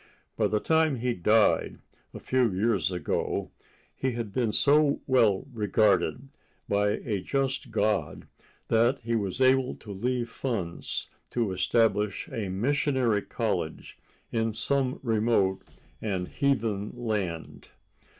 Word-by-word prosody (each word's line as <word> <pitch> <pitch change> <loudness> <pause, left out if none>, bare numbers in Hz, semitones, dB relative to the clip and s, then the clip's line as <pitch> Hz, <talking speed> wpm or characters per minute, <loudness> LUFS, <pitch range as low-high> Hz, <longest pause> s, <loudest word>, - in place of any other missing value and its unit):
By - - +2
the 105 - 0
time 160 +2 +2
he 125 0 -1
died, 105 +3 +2 0.3
a - - -9
few 130 -4 +1
years 100 0 +1
ago, 90 -1 -2 0.4
he 130 -1 -1
had 115 -4 -5
been 120 -2 +1
so 145 +4 +3
well 115 -7 +3
rewarded 110 +4 +1 0.4
by 105 0 +2
a 105 -5 -1
just 135 +5 -1
God 105 -8 -1 0.4
that 120 +4 +3
he 115 0 -1
was 100 +1 -2
able 130 0 +3
to 105 - -11
leave 120 +4 -1
funds 110 -8 -4 0.2
to 115 -5 -1
establish 105 +2 +1
a 105 -4 -4
missionary 125 +1 +1
college - - -3 0.3
in 115 -1 0
some 135 +2 0
remote 110 -5 +1 0.4
and 95 -4 -2
heathen 115 -8 0
land. 105 -9 -4
115 Hz, 120 wpm, -27 LUFS, 100-130 Hz, 0.4 s, so